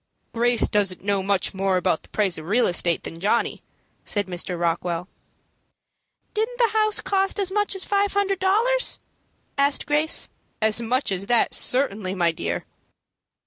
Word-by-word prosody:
"Grace 240 +1 +2
doesn't 195 -4 0
know 200 -1 +1
much 195 0 0
more 190 -1 +1
about 170 -2 +1
the - - -17
price 200 -5 0
of 155 - -10
real 235 +6 +3
estate 175 -1 +1
than 165 - -8
Johnny," 210 +6 0 0.4
said 205 -1 -2
Mr. 180 -1 -5
Rockwell. 170 +1 -1 1.3
"Didn't 445 +3 -1
the 475 -2 +3
house 430 0 +2
cost 390 +1 0
as 385 -2 0
much 415 0 0
as 385 - +1
five 405 0 +1
hundred 395 -1 0
dollars?" 455 +7 +3 0.6
asked 280 0 +2
Grace. 300 +2 +1 0.3
"As 220 +1 +2
much 250 +1 0
as 190 +1 -2
that 240 -1 +3
certainly, 210 -8 +1
my 170 -2 +2
dear." 160 - -4
225 Hz, 155 wpm, -23 LUFS, -, 1.3 s, real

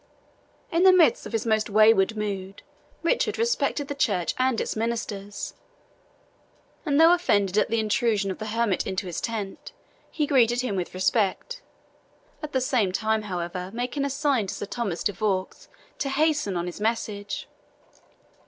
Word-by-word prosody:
In 335 - +2
the 380 0 +8
midst 340 -9 +4
of - - -10
his 225 0 -1
most 220 -1 +1
wayward 215 0 +4
mood, 195 -2 -4 0.4
Richard 335 +9 +1
respected 455 -10 0
the 285 - -3
church 205 -11 0
and 255 -2 +2
its - - -2
ministers; 215 -3 -4 1.3
and 285 0 +2
though 330 +2 +8
offended 205 - +1
at 210 - +2
the 230 +1 +1
intrusion 215 -2 +1
of - - -7
the 215 - -5
hermit 220 -3 0
into 190 +1 -2
his 175 -3 -4
tent, 210 -4 -5 0.4
he 300 - -1
greeted 245 -4 +3
him 245 -6 -2
with 185 -1 -4
respect 215 - 0 0.8
at 305 -1 -6
the 260 - 0
same 240 -7 +1
time, 220 +3 0
however, 180 -2 -4
making 250 +4 -2
a 280 - 0
sign 275 -6 0
to - - -4
Sir - - -5
Thomas 205 -5 -3
de 205 - 0
Vaux 190 -2 -2 0.3
to 275 - -1
hasten 290 - +1
on 170 - -2
his 180 +3 -7
message. 210 -2 -2
220 Hz, 160 wpm, -25 LUFS, 195-265 Hz, 1.3 s, the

